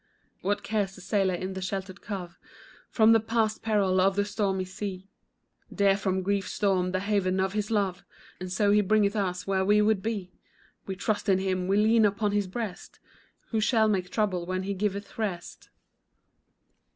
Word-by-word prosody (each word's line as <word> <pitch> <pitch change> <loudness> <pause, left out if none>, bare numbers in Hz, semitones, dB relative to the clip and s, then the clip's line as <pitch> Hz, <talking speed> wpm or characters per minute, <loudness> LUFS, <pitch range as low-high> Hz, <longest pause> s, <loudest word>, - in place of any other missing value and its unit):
What 205 +2 -1
cares 200 -3 -1
the - - -12
sailor 190 -1 +1
in 185 +2 -4
the 190 - -5
sheltered 190 0 -5
cove 190 -5 -6 0.5
For 220 - +3
the 225 0 +7
past 220 -1 0
peril 200 -4 +2
of 190 +1 +3
the 205 0 +1
stormy 195 -2 -1
sea; 190 0 -7 0.6
Dear 200 -1 +3
from 190 -1 -1
grief's 200 0 -1
storm 190 -3 +1
the 185 0 -1
haven 195 -2 0
of 190 0 0
His 210 -1 -2
love, 200 -4 0 0.4
And 185 0 -6
so 200 +2 +2
He 210 0 +5
bringeth 205 +1 +2
us 180 -3 -2
where 190 -1 +1
we 205 +2 +4
would 210 -2 +2
be; 200 -4 -4 0.5
We 190 - -3
trust 205 +2 -1
in 190 - +5
Him, 185 -1 -1
we 195 +1 +2
lean 220 +2 +4
upon 205 0 +1
His 205 -1 0
breast, 205 -1 -6 0.5
Who 220 -2 +1
shall 220 0 +3
make 185 -4 0
trouble 185 -5 -1
when 185 0 -2
He 200 +1 -2
giveth 200 +2 -3
rest? 195 -6 -4
200 Hz, 180 wpm, -27 LUFS, 185-210 Hz, 0.6 s, the